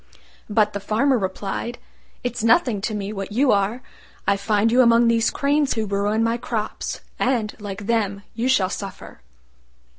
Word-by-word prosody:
But 210 Hz, 0 st, +2 dB
the 200 Hz, -, -3 dB
Farmer 225 Hz, +7 st, +2 dB
replied, 200 Hz, +3 st, -3 dB, 0.5 s
"It's 245 Hz, -2 st, -3 dB
nothing 230 Hz, -, +3 dB
to 215 Hz, +2 st, -2 dB
me 205 Hz, 0 st, -4 dB
what 195 Hz, -1 st, -5 dB
you 255 Hz, +5 st, +3 dB
are: 205 Hz, +5 st, +1 dB, 0.4 s
I 200 Hz, -, +4 dB
find 210 Hz, +2 st, +1 dB
you 250 Hz, +2 st, +5 dB
among 235 Hz, -1 st, +5 dB
these 230 Hz, 0 st, +3 dB
cranes, 285 Hz, 0 st, +1 dB
who 220 Hz, -1 st, -1 dB
ruin 205 Hz, +2 st, 0 dB
my 230 Hz, +1 st, +1 dB
crops, 220 Hz, -2 st, -4 dB, 0.2 s
and, 235 Hz, -5 st, 0 dB
like 205 Hz, 0 st, -6 dB
them, 205 Hz, -3 st, 0 dB
you 240 Hz, +3 st, -1 dB
shall 195 Hz, -8 st, +3 dB
suffer." 195 Hz, -, -7 dB
220 Hz, 160 wpm, -22 LUFS, 200-240 Hz, 0.5 s, you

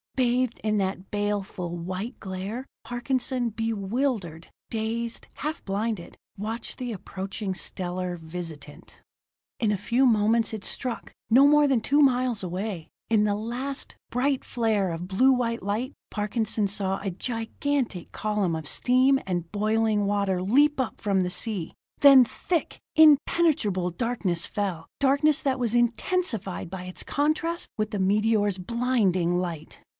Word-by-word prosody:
Bathed 250 Hz, -1 st, +1 dB
in 215 Hz, -1 st, +1 dB
that 190 Hz, -1 st, -2 dB
baleful, 205 Hz, -4 st, -2 dB
white 185 Hz, +8 st, -5 dB
glare, 200 Hz, +7 st, -5 dB, 0.2 s
Parkinson, 245 Hz, 0 st, -1 dB
bewildered, 220 Hz, -, -2 dB, 0.2 s
dazed, 230 Hz, +1 st, -3 dB
half 305 Hz, +3 st, -4 dB
blinded, 205 Hz, -2 st, -3 dB, 0.2 s
watched 220 Hz, +4 st, -4 dB
the 250 Hz, -2 st, -4 dB
approaching 195 Hz, 0 st, -5 dB
stellar 180 Hz, 0 st, -3 dB
visitant. 160 Hz, -3 st, -9 dB, 0.6 s
In 220 Hz, -3 st, +2 dB
a 205 Hz, -, -1 dB
few 240 Hz, +6 st, +2 dB
moments 225 Hz, 0 st, +3 dB
it 215 Hz, -2 st, -5 dB
struck 250 Hz, -3 st, -3 dB, 0.2 s
no 270 Hz, +5 st, +7 dB
more 295 Hz, 0 st, +5 dB
than 260 Hz, -5 st, +2 dB
two 285 Hz, +6 st, +3 dB
miles 250 Hz, -5 st, +2 dB
away. 180 Hz, -2 st, -4 dB, 0.2 s
In 220 Hz, -2 st, +4 dB
the 205 Hz, -1 st, +1 dB
last, 245 Hz, +6 st, -4 dB, 0.2 s
bright 265 Hz, +2 st, +1 dB
flare 220 Hz, -6 st, 0 dB
of 165 Hz, +2 st, -5 dB
blue 245 Hz, +8 st, +4 dB
white 235 Hz, -4 st, 0 dB
light, 220 Hz, +7 st, -2 dB, 0.2 s
Parkinson 215 Hz, 0 st, 0 dB
saw 195 Hz, -1 st, 0 dB
a 195 Hz, -1 st, -3 dB
gigantic 230 Hz, +1 st, -2 dB
column 210 Hz, -5 st, -1 dB
of 160 Hz, -2 st, -5 dB
steam 260 Hz, -, +3 dB
and 175 Hz, -3 st, -2 dB
boiling 215 Hz, 0 st, +1 dB
water 200 Hz, -2 st, 0 dB
leap 280 Hz, +9 st, +3 dB
up 260 Hz, -, -2 dB
from 200 Hz, -3 st, +2 dB
the 180 Hz, -, 0 dB
sea. 200 Hz, -5 st, -1 dB, 0.3 s
Then 275 Hz, -3 st, +9 dB
thick, 335 Hz, +7 st, -2 dB, 0.2 s
impenetrable 290 Hz, -, +4 dB
darkness 195 Hz, -5 st, -1 dB
fell 185 Hz, -6 st, -3 dB
darkness 285 Hz, +2 st, +3 dB
that 265 Hz, -2 st, 0 dB
was 235 Hz, -2 st, +1 dB
intensified 240 Hz, -, 0 dB
by 185 Hz, 0 st, -6 dB
its 185 Hz, -, -6 dB
contrast 310 Hz, +4 st, -1 dB
with 215 Hz, -1 st, 0 dB
the 210 Hz, -2 st, -3 dB
meteor's 205 Hz, 0 st, +2 dB
blinding 190 Hz, -5 st, +1 dB
light. 170 Hz, -4 st, -5 dB
215 Hz, 140 wpm, -26 LUFS, 190-250 Hz, 0.6 s, Then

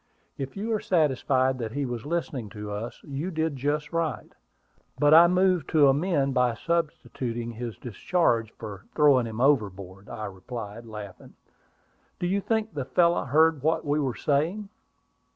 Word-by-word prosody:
"If 135 Hz, +6 st, -6 dB
you 220 Hz, +3 st, -2 dB
are 215 Hz, -, +1 dB
satisfied 130 Hz, -6 st, +1 dB
that 115 Hz, -2 st, -4 dB
he 140 Hz, 0 st, -1 dB
was 120 Hz, 0 st, -5 dB
listening 145 Hz, -9 st, -3 dB
to 105 Hz, 0 st, -6 dB
us, 105 Hz, +3 st, -6 dB
you 145 Hz, +5 st, -4 dB
did 160 Hz, -3 st, -1 dB
just 145 Hz, +3 st, -2 dB
right. 165 Hz, -2 st, -2 dB, 0.6 s
But 150 Hz, 0 st, +4 dB
I 170 Hz, +2 st, +9 dB
move 180 Hz, -1 st, +2 dB
to 145 Hz, -3 st, +5 dB
amend 140 Hz, -1 st, +1 dB
by 125 Hz, -2 st, +2 dB
substituting 125 Hz, -7 st, -3 dB
his 115 Hz, 0 st, -6 dB
discharge 120 Hz, -, 0 dB
for 105 Hz, -4 st, -9 dB
throwing 140 Hz, -6 st, +4 dB
him 110 Hz, 0 st, -6 dB
overboard," 100 Hz, -7 st, 0 dB
I 110 Hz, -2 st, -5 dB
replied, 105 Hz, +3 st, -8 dB
laughing. 105 Hz, -3 st, -10 dB, 0.8 s
"Do -, -, -3 dB
you 195 Hz, +3 st, +1 dB
think 220 Hz, +1 st, -1 dB
the 140 Hz, -, -3 dB
fellow 170 Hz, 0 st, +2 dB
heard 155 Hz, +2 st, +3 dB
what 160 Hz, +1 st, 0 dB
we 145 Hz, +1 st, +1 dB
were 135 Hz, -5 st, -1 dB
saying?" 165 Hz, +9 st, 0 dB
140 Hz, 155 wpm, -26 LUFS, 115-165 Hz, 0.8 s, I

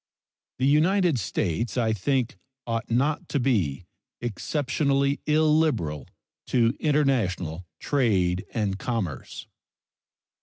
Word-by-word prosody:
The 130 Hz, -, 0 dB
United 165 Hz, +1 st, +3 dB
States, 110 Hz, +2 st, -2 dB
I 115 Hz, -2 st, +2 dB
think, 120 Hz, +3 st, 0 dB, 0.3 s
ought 115 Hz, -1 st, -3 dB
not 140 Hz, +6 st, 0 dB
to 145 Hz, -, 0 dB
be 100 Hz, -, 0 dB, 0.3 s
exceptionally 140 Hz, -, 0 dB
illiberal 150 Hz, -, +2 dB, 0.4 s
to 120 Hz, 0 st, +2 dB
international 110 Hz, -, 0 dB
trade 95 Hz, -10 st, +1 dB
and 100 Hz, -4 st, -1 dB
commerce. 110 Hz, -, -4 dB
120 Hz, 90 wpm, -26 LUFS, 95-145 Hz, 0.4 s, United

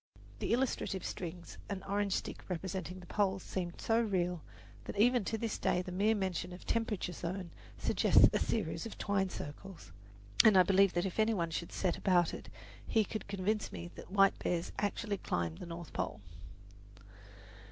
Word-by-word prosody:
The -, -, -1 dB
illustrative 235 Hz, -6 st, 0 dB
strings 175 Hz, -1 st, -6 dB
and 195 Hz, -1 st, -3 dB
the 195 Hz, -, -13 dB
orange 200 Hz, 0 st, +1 dB
stick -, -, -3 dB
representing 185 Hz, 0 st, -4 dB
the -, -, -11 dB
poles 190 Hz, -1 st, 0 dB
seemed 175 Hz, -2 st, -4 dB
so 225 Hz, +1 st, +2 dB
real 180 Hz, -6 st, 0 dB, 0.4 s
that -, -, -6 dB
even 245 Hz, +2 st, +4 dB
to 225 Hz, -, -1 dB
this 225 Hz, -1 st, -3 dB
day 180 Hz, -, +1 dB
the 180 Hz, -, -6 dB
mere 205 Hz, +5 st, +3 dB
mention 185 Hz, -3 st, -2 dB
of 180 Hz, -, -11 dB
temperate 225 Hz, -4 st, -1 dB
zone 175 Hz, 0 st, -4 dB, 0.3 s
suggests -, -, +5 dB
a -, -, +2 dB
series 190 Hz, -3 st, -1 dB
of 225 Hz, -, -9 dB
twine 195 Hz, -2 st, 0 dB
circles; 175 Hz, +3 st, -8 dB, 0.5 s
and 215 Hz, -3 st, +7 dB
I 185 Hz, -, +9 dB
believe 195 Hz, 0 st, +4 dB
that 175 Hz, +2 st, +1 dB
if 190 Hz, +2 st, -3 dB
any 220 Hz, +1 st, +3 dB
one 170 Hz, -3 st, -1 dB
should 170 Hz, +1 st, -3 dB
set 180 Hz, -3 st, 0 dB
about 175 Hz, -3 st, +3 dB
it -, -, -7 dB, 0.4 s
he 220 Hz, -, +3 dB
could 215 Hz, +1 st, -5 dB
convince 200 Hz, +2 st, -1 dB
me 85 Hz, -1 st, -7 dB
that -, -, -11 dB
white 195 Hz, -1 st, +4 dB
bears 175 Hz, 0 st, -1 dB
actually 205 Hz, 0 st, -1 dB
climb 85 Hz, -1 st, -2 dB
the -, -, -8 dB
North 170 Hz, 0 st, -7 dB
Pole. -, -, -2 dB
190 Hz, 180 wpm, -34 LUFS, 175-205 Hz, 0.5 s, I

